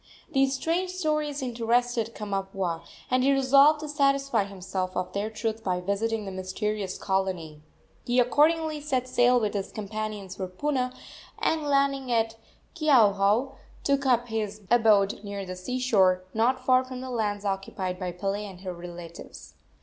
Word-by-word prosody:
These 270 -2 +2
strange 340 +6 -1
stories 305 -5 -1
interested 240 -1 0
Kamapuaa, 195 -4 -3 0.3
and 255 0 +3
he 275 - +4
resolved 275 +3 +5
to 305 - -5
satisfy 275 -6 +2
himself 185 -1 -4
of 180 0 -3
their 205 +2 -1
truth 220 0 -3
by 180 -3 0
visiting 210 +4 -1
the 195 - -5
mysterious 190 +1 -3
colony. 185 -6 -2 0.5
He 245 +1 +3
accordingly 305 +4 +3
set 260 -4 -1
sail 245 0 +4
with 210 -3 -1
his 200 -2 -3
companions 210 -2 -5
for 190 - -3
Puna, 255 +6 -1 0.5
and, 320 - +1
landing 275 -2 +1
at 225 -1 +1 0.4
Keauhou, 230 -5 +4 0.3
took 280 -1 +1
up 245 -1 +2
his 215 -1 -3
abode 215 -4 +4
near 200 -1 -5
the 185 0 -6
sea 185 +8 -4
shore, 190 -7 +3
not 255 +3 +1
far 255 0 +5
from 255 -1 -7
the 260 0 -6
lands 205 -3 -2
occupied 195 -2 -3
by 180 -2 -3
Pele 195 +4 -3
and 190 -3 -9
her 185 -2 -5
relatives. 170 -1 -10
225 Hz, 155 wpm, -27 LUFS, 195-260 Hz, 0.5 s, resolved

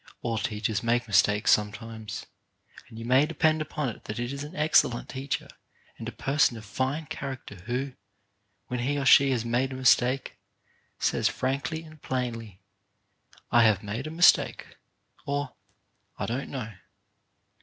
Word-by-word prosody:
All 115 -2 -1
teachers 105 -1 -1
make 120 +1 +1
mistakes 105 +1 +3
sometimes, 110 +1 -1 0.6
and 110 - -12
you 115 - -6
may 130 +5 +4
depend 155 0 +2
upon 150 -1 -3
it 110 - -10
that 105 - -5
it 120 +2 -3
is 140 +1 -5
an 150 - -9
excellent 150 -6 +3
teacher 135 +1 -3 0.5
and 115 - -4
a - - -8
person 135 +1 +1
of 110 - -10
fine 130 +9 -2
character 135 -5 -6
who, 130 +3 -2 0.7
when 125 +3 -4
he 140 +4 0
or 140 - -1
she 140 +1 +7
has 120 -3 0
made 125 +3 0
a - - -5
mistake, 130 0 +2 0.6
says - - +1
frankly 140 +5 -2
and 155 -2 -15
plainly, 115 -7 -4 0.9
"I 120 - +6
have 110 -3 +4
made 110 +7 -4
a - - -4
mistake, 170 +2 +3 0.3
" - - -34
or 145 -2 -2 0.6
"I - - -2
don't 125 +4 -3
know. 110 -5 -5
125 Hz, 155 wpm, -27 LUFS, 115-140 Hz, 0.9 s, she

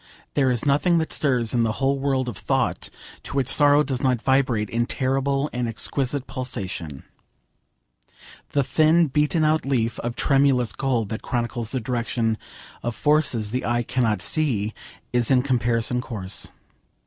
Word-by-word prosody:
There 135 -3 +2
is 125 0 0
nothing 150 +5 +3
that 160 -1 -1
stirs 125 -6 +1
in 120 - +2
the 110 -1 +1
whole 135 +3 0
world 135 -2 0
of 120 - -4
thought - - -1 0.3
to - - -8
which 135 -3 +1
sorrow 145 +1 +4
does 130 -3 -3
not 130 -3 +1
vibrate 130 -4 +1
in 120 +3 -1
terrible 135 +2 0
and 125 -1 -1
exquisite 130 +4 0
pulsation. 95 - -4 1.5
The 140 - +2
thin 160 +3 +3
beaten 150 +4 +1
out 155 +1 +2
leaf 120 -4 -1
of 120 0 -4
tremulous 135 -5 +2
gold 125 -6 -1
that 110 - -4
chronicles 120 -2 -2
the 130 - -1
direction 115 -2 -1 0.4
of 120 -1 -3
forces 145 -8 +1
the 125 +2 -2
eye 120 +1 0
cannot 115 -5 0
see 115 -9 +1 0.4
is 120 -2 +3
in 130 -2 +4
comparison 120 -2 0
coarse. 105 -7 -5
125 Hz, 155 wpm, -23 LUFS, 115-140 Hz, 1.5 s, sorrow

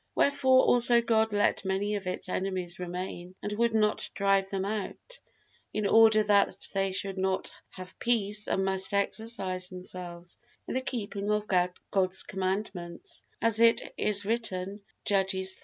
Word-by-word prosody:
Wherefore 260 -2 +3
also 240 -1 +7
God 225 -1 +1
let 205 0 +1
many 195 +2 -2
of 200 -3 -4
its 185 - -3
enemies 185 -1 -2
remain 180 0 -6
and 205 - -3
would 230 +1 0
not 210 -1 +1
drive 195 -1 +1
them 195 -1 -3
out, 215 - -6 0.5
in 215 -1 -2
order 220 +1 +5
that 205 -1 +2 0.2
they 195 -1 0
should 190 0 -2
not 190 0 -2 0.2
have 185 -1 -11
peace 210 -3 +1
and 190 - 0
must 190 +1 +2
exercise 200 -3 -1
themselves 180 -1 -7 0.3
in - - -4
the 260 - -1
keeping 210 -5 -4
of 210 0 0 0.5
God's 190 -1 +3
commandments, 190 - -4 0.2
as 225 -1 +4
it 230 0 +3
is 205 -1 +2
written, 205 -3 -2 0.2
Judges 190 -1 0
iii. - - -16
200 Hz, 150 wpm, -28 LUFS, 190-220 Hz, 0.5 s, also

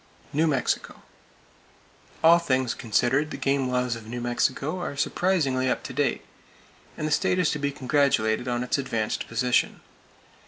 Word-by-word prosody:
New 155 +3 +2
Mexico: 140 -5 -1 1.2
All 170 +1 +7
things 130 -6 0
considered, 125 +6 +1
the - - -6
game 135 -1 0
laws 125 -1 0
of 110 -2 -10
New 120 +2 -5
Mexico 130 +7 -1
are 145 -5 -5
surprisingly 140 -6 +1
up - - -1
to - - -7
date, 140 -2 -1 0.7
and 155 - -2
the - - -3
state 150 +4 +2
is 180 -4 +2
to 150 - -3
be 140 0 -1
congratulated 130 -5 +1
on 120 0 -1
its 125 - 0
advanced 115 -5 -2
position. 125 +1 +1
130 Hz, 155 wpm, -25 LUFS, 125-150 Hz, 1.2 s, All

